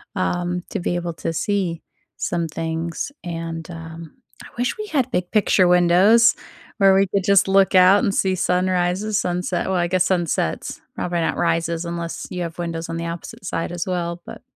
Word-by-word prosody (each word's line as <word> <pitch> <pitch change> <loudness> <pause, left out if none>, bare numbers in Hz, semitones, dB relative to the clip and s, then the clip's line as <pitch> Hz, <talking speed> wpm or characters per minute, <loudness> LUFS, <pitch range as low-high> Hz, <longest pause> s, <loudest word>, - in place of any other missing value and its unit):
um, 175 -1 -1
to - - -3
be 175 0 -1
able 175 -1 -3
to 165 - -4
see 180 -2 -1 0.4
some 170 -1 -1
things, 165 - -4
and, 165 -2 -5
um, 165 -1 -9 0.3
I - - -12
wish 245 +2 -1
we 430 - -4
had 270 - 0
big 180 0 -2
picture 200 -3 +3
windows 180 +7 +5 0.4
where 195 -2 +5
we 195 +1 +3
could 195 0 -1
just 200 0 +4
look 195 0 +4
out 185 +4 +6
and 200 -5 +1
see 190 -1 +1
sunrises, 185 +3 0
sunset 180 -1 -1
well, 190 - 0
I 175 -1 +1
guess 185 0 +2
sunsets. 170 - -1 0.2
Probably 175 -1 -2
not 165 - -1
rises 170 0 0
unless 170 0 -5
you 180 -1 -4
have 165 0 -7
windows 165 -1 -3
on 165 - -3
the 170 0 -3
opposite 170 0 -8
side 165 - -3
as 175 0 -4
well. 175 -1 -3
But - - -9
175 Hz, 185 wpm, -21 LUFS, 170-190 Hz, 0.4 s, out